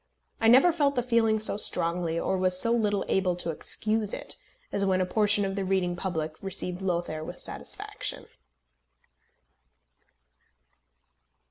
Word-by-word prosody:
I 225 Hz, -, +2 dB
never 260 Hz, +9 st, +6 dB
felt 290 Hz, -4 st, 0 dB
the 245 Hz, -, 0 dB
feeling 230 Hz, -2 st, +2 dB
so 215 Hz, -1 st, +3 dB
strongly, 170 Hz, -4 st, +1 dB
or 190 Hz, -, -1 dB
was 185 Hz, -1 st, +3 dB
so 230 Hz, -, +4 dB
little 210 Hz, -4 st, 0 dB
able 185 Hz, -2 st, +1 dB
to 175 Hz, -1 st, -3 dB
excuse 215 Hz, +6 st, +1 dB
it, -, -, -2 dB, 0.4 s
as 200 Hz, -, -1 dB
when 190 Hz, -1 st, +1 dB
a 185 Hz, -, +1 dB
portion 205 Hz, +1 st, +2 dB
of 195 Hz, 0 st, -3 dB
the 200 Hz, -, -2 dB
reading 185 Hz, -2 st, 0 dB
public 160 Hz, -4 st, -4 dB
received 185 Hz, -1 st, -3 dB
Lothair 170 Hz, -4 st, -2 dB
with -, -, -8 dB
satisfaction. -, -, -6 dB
195 Hz, 140 wpm, -27 LUFS, 180-220 Hz, 0.4 s, never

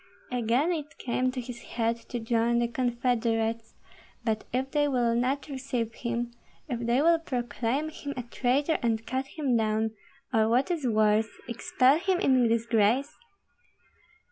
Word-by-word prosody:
Again 250 Hz, +7 st, +1 dB
it 305 Hz, -3 st, -4 dB
came 255 Hz, +1 st, 0 dB
to 255 Hz, 0 st, -4 dB
his 245 Hz, -1 st, -7 dB
head 230 Hz, 0 st, -1 dB
to 245 Hz, -, -3 dB
join 230 Hz, +1 st, +1 dB
the 235 Hz, 0 st, +2 dB
confederates; 230 Hz, -2 st, -1 dB, 0.5 s
but 220 Hz, -2 st, -1 dB
if 260 Hz, +2 st, -1 dB
they 295 Hz, -1 st, +2 dB
will 245 Hz, -4 st, +2 dB
not 255 Hz, +4 st, 0 dB
receive 255 Hz, -5 st, -3 dB
him, 235 Hz, 0 st, -3 dB, 0.4 s
if 245 Hz, -4 st, -3 dB
they 240 Hz, +4 st, +2 dB
will 335 Hz, 0 st, +5 dB
proclaim 250 Hz, 0 st, -2 dB
him 285 Hz, -2 st, -6 dB
a 250 Hz, -, -3 dB
traitor 265 Hz, +6 st, +1 dB
and 225 Hz, -2 st, 0 dB
cut 260 Hz, +1 st, -2 dB
him 275 Hz, -4 st, -1 dB
down, 220 Hz, 0 st, +1 dB, 0.4 s
or 220 Hz, -1 st, +3 dB
what 255 Hz, +9 st, +2 dB
is 315 Hz, -7 st, -1 dB
worse, 215 Hz, 0 st, +3 dB, 0.2 s
expel 255 Hz, +4 st, +3 dB
him 370 Hz, 0 st, +1 dB
in 260 Hz, -8 st, +4 dB
disgrace? 230 Hz, +4 st, +2 dB
245 Hz, 150 wpm, -28 LUFS, 230-270 Hz, 0.5 s, will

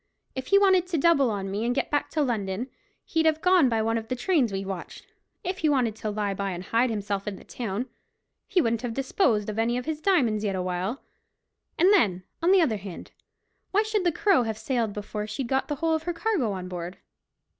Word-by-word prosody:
If 260 Hz, -1 st, -5 dB
he 395 Hz, -, +5 dB
wanted 380 Hz, -3 st, +4 dB
to 355 Hz, -3 st, -1 dB
double 280 Hz, -4 st, +4 dB
on 195 Hz, -2 st, -3 dB
me 205 Hz, +3 st, -2 dB
and 245 Hz, +1 st, 0 dB
get -, -, -1 dB
back 290 Hz, -1 st, 0 dB
to 310 Hz, -, 0 dB
London, 225 Hz, -1 st, -2 dB, 0.3 s
he'd 320 Hz, -1 st, +1 dB
have 315 Hz, 0 st, +2 dB
gone 360 Hz, -6 st, +4 dB
by 225 Hz, -2 st, +1 dB
one 225 Hz, +1 st, +1 dB
of 225 Hz, -, -10 dB
the 255 Hz, -, -2 dB
trains 265 Hz, -, +1 dB
we've 195 Hz, 0 st, -3 dB
watched; 190 Hz, -3 st, -7 dB, 0.4 s
if 375 Hz, 0 st, -3 dB
he 310 Hz, -, +2 dB
wanted 250 Hz, -7 st, +1 dB
to 215 Hz, -, -3 dB
lie 205 Hz, -1 st, -1 dB
by 195 Hz, 0 st, -3 dB
and 175 Hz, +1 st, -6 dB
hide 230 Hz, +6 st, +2 dB
himself 205 Hz, -2 st, -3 dB
in 205 Hz, -, -2 dB
the -, -, -13 dB
town, 230 Hz, 0 st, -4 dB, 0.6 s
he 360 Hz, -, +3 dB
wouldn't 230 Hz, -4 st, 0 dB
have 240 Hz, -3 st, -4 dB
disposed 260 Hz, -, +1 dB
of 215 Hz, +1 st, -3 dB
any 235 Hz, +2 st, +1 dB
of 250 Hz, -, -4 dB
his 310 Hz, -1 st, -3 dB
diamonds 245 Hz, -, +2 dB
yet 200 Hz, -2 st, 0 dB
awhile—and 185 Hz, -, -2 dB
then, 190 Hz, -, +3 dB, 0.2 s
on 345 Hz, +3 st, +3 dB
the 385 Hz, -1 st, +6 dB
other 240 Hz, -10 st, +2 dB
hand, 195 Hz, -3 st, -9 dB, 0.6 s
why 415 Hz, +3 st, +3 dB
should 430 Hz, -2 st, 0 dB
the 350 Hz, -, +3 dB
Crow 385 Hz, -2 st, +3 dB
have 220 Hz, -2 st, -2 dB
sailed 225 Hz, -1 st, -1 dB
before 210 Hz, +1 st, -5 dB
she'd 255 Hz, +3 st, -4 dB
got 265 Hz, +2 st, 0 dB
the 295 Hz, -, -2 dB
whole 325 Hz, +2 st, 0 dB
of 315 Hz, -, 0 dB
her 350 Hz, +2 st, -3 dB
cargo 335 Hz, -, 0 dB
on 185 Hz, -2 st, -5 dB
board? 180 Hz, 0 st, -6 dB
240 Hz, 225 wpm, -26 LUFS, 205-320 Hz, 0.6 s, the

